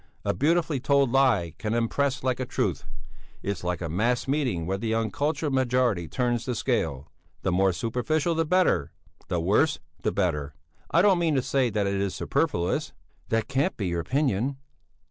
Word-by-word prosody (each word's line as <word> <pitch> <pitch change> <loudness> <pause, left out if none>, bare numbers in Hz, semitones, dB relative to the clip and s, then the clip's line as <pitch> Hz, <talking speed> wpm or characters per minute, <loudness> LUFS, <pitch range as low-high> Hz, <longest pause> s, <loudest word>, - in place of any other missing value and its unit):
A - - +1
beautifully 155 - +1
told 140 -1 +2
lie 120 - +3
can 110 +1 -1
impress 130 +4 0
like 130 -1 0
a 130 - -1
truth! - - -1 0.6
It's 100 -2 -3
like 90 -1 -2
a 85 - -2
mass 115 +11 0
meeting 130 - 0
where 95 +3 -2
the 110 +1 -1
uncultured 145 +7 -1
majority 125 -8 +1
turns 120 +1 -1
the 125 - -2
scale. 80 - -1 0.3
The 95 - +1
more 95 +2 +3
superficial 125 - 0
the 165 0 +1
better 180 +3 +2 0.3
the 90 - -1
worse, 105 - +2 0.2
the - - 0
better! 75 -8 -1 0.3
I 170 - +4
don't 195 -4 +5
mean 165 -3 +1
to 130 - +1
say 130 -3 +1
that 105 -2 0
it 100 0 0
is 100 -2 -2
superfluous." 85 +1 -1 0.4
"That 115 -1 0
can't 135 +6 0
be 95 -4 -2
your 85 0 -1
opinion!" 135 - 0
120 Hz, 175 wpm, -26 LUFS, 95-140 Hz, 0.6 s, don't